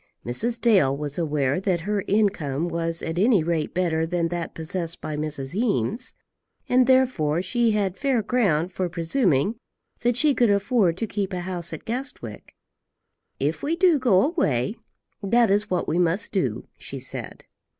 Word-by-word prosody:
Mrs. 230 - 0
Dale 190 - +3
was 145 +2 -4
aware 145 -3 0
that 185 -3 0
her 205 +2 -1
income 175 -8 +1
was 165 -1 -2
at 165 +1 -2
any 210 -4 +4
rate 165 -2 -1
better 165 -2 0
than 170 -1 -1
that 175 -1 -4
possessed 165 +1 -4
by 155 - -5
Mrs. 150 -2 -2
Eames, 220 - -1 0.5
and 250 0 +4
therefore 215 - +2
she 235 +4 +1
had 200 -3 -1
fair 265 -5 +1
ground 190 -7 +1
for 185 -1 -2
presuming 170 - +1 0.4
that 245 0 +1
she 300 +1 +4
could 240 -3 +3
afford 200 -3 +2
to 225 - -2
keep 200 -2 -3
a 180 - -2
house 175 -2 -4
at 160 - -7
Guestwick. 230 - -5 0.8
"If 145 +4 -1
we 315 +3 0
do 340 -3 +4
go 220 -8 +4
away, 210 - 0 0.5
that 230 +1 +3
is 205 +1 +1
what 180 - -1
we 165 +3 0
must 180 +4 +1
do," 130 - -2
she - - -7
said. - - -6
185 Hz, 165 wpm, -24 LUFS, 160-230 Hz, 0.8 s, any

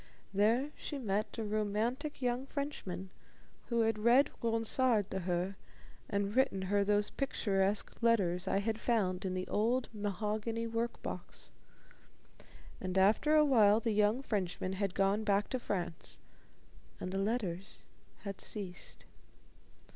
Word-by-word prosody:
There 230 +8 +2
she 290 - -5
met 215 -4 -2
a 225 - -2
romantic 220 +7 -1
young 250 +2 0
Frenchman 195 - -5 0.6
who 235 -1 +1
had 225 -1 +1
read 240 +6 +5
Ronsard 230 -1 +1
to 190 - -1
her 180 +1 -1 0.5
and 200 +1 -1
written 260 -8 +2
her 200 +2 +2
those 205 +1 +2
picturesque 200 -7 0
letters 190 -7 +2
I - - +2
had 220 +1 -1
found 195 -6 +1
in 185 -1 -1
the 185 0 -3
old 240 +4 +1
mahogany 215 +2 -2
work 230 +1 -3
box. - - -6 1.3
And 185 0 -2
after 215 +11 +4
a 305 -1 +6
while 220 -6 +5
the 230 0 -1
young 210 +5 +2
Frenchman 185 -4 -2
had 195 -1 -2
gone 195 +2 +2
back 205 -1 +1
to 255 - -1
France, 175 - -4 0.8
and 185 - -4
the 195 - -1
letters 195 -3 -2 0.4
had 200 -1 -5
ceased. 190 -4 -6
210 Hz, 135 wpm, -33 LUFS, 195-235 Hz, 1.3 s, a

